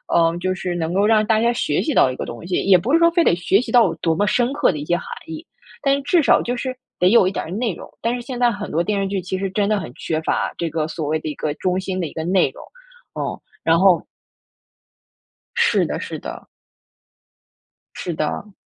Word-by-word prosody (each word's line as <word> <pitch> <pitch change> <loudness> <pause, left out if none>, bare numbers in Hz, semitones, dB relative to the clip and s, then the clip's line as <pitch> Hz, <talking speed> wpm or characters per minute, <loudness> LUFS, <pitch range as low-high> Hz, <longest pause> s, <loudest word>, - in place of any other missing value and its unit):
嗯， 165 0 +3
就 185 +1 -1
是 180 -1 -4
能 165 0 -2
够 200 +3 +3
让 215 -1 +4
大 220 0 +3
家 235 +1 +3
学 235 - 0
习 305 - -1
到 130 - +5
一 - - -6
个 - - -5
东 120 +7 -8
西， 180 0 -1
也 190 -1 +6
不 225 - -2
是 330 - +6
说 335 0 +6
非 340 0 +2
得 175 - +3
学 180 +3 +2
习 - - -6
到 245 -2 +6
有 - - -1
多 165 - 0
么 205 +5 +1
深 245 +4 +1
刻 285 - +3
的 155 - -5
一 145 - -5
些 175 - +1
含 175 - -6 0.2
义， 160 -1 -7 0.4
但 275 -1 +3
是 280 - -3
至 325 +4 +3
少 - - +5
就 245 - -2
是 255 +1 -3 0.2
得 180 - +5
有 215 -3 +5
一 - - 0
点 - - -3
儿 160 - -8
内 220 +1 -1
容。 - - -11
但 235 +1 0
是 245 - -5
现 245 0 -6
在 245 -1 +4
很 205 -1 -6
多 165 - +1
电 200 +2 -1
视 195 - -1
剧 195 -1 -2
其 185 +1 -3
实 195 0 -2
真 200 +1 +1
的 215 - +2
很 120 - -7
缺 155 - -2
乏， - - -1
这 170 - -2
个 155 0 -2
所 160 -1 -4
谓 155 +1 0
的 155 - -5
一 150 - -5
个 150 - -2
中 180 +2 -1
心 190 0 -3
的 175 - -1
一 - - -11
个 160 - -4
内 185 +2 +2
容。 - - -12 0.6
嗯， - - -2 0.3
然 165 0 +4
后 185 -3 +4 1.5
是 - - +3
的， - - -3
是 - - -5
的。 - - -8 1.5
是 175 - -4
的。 155 +7 -3
190 Hz, 275 characters per minute, -21 LUFS, 165-230 Hz, 1.5 s, 也